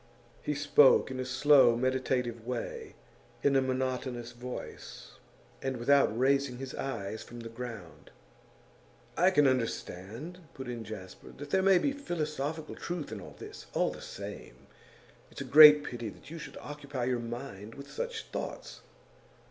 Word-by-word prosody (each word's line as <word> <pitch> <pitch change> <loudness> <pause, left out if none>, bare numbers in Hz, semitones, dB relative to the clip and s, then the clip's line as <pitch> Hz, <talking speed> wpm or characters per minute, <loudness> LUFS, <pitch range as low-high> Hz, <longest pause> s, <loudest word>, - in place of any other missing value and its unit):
He 150 - -2
spoke 145 -1 +5
in 130 - -5
a 130 - -2
slow, 130 -2 +5
meditative 125 -2 -1
way, 120 0 -5 0.5
in 140 -1 +3
a 135 - +5
monotonous 130 -2 -2
voice, 125 +1 -9 0.4
and 135 -1 -2
without 120 -2 +3
raising 135 0 +2
his 130 0 -6
eyes 110 -5 -4
from 120 0 -10
the 115 - -7
ground. 110 - -8 1.1
'I 180 +2 +5
can 150 -7 +4
understand,' 125 - -3 0.2
put 130 -1 -7
in 120 -2 -5
Jasper, 100 -3 -9
'that 145 +1 -8
there 190 - +3
may 190 -1 +6
be 280 - +1
philosophical 155 - -3
truth 170 -3 -5
in 105 - -6
all - - -11
this. - - -10
All - - +2
the - - -10
same, - - -9 0.6
it's - - -9
a - - -1
great 150 0 +9
pity 120 -4 -5
that 135 - -14
you 165 - -6
should 150 - -9
occupy 145 -3 -6
your 125 0 0
mind 115 -3 -7
with 140 0 -10
such 485 -2 -4
thoughts. - - -6
130 Hz, 155 wpm, -30 LUFS, 120-145 Hz, 1.1 s, great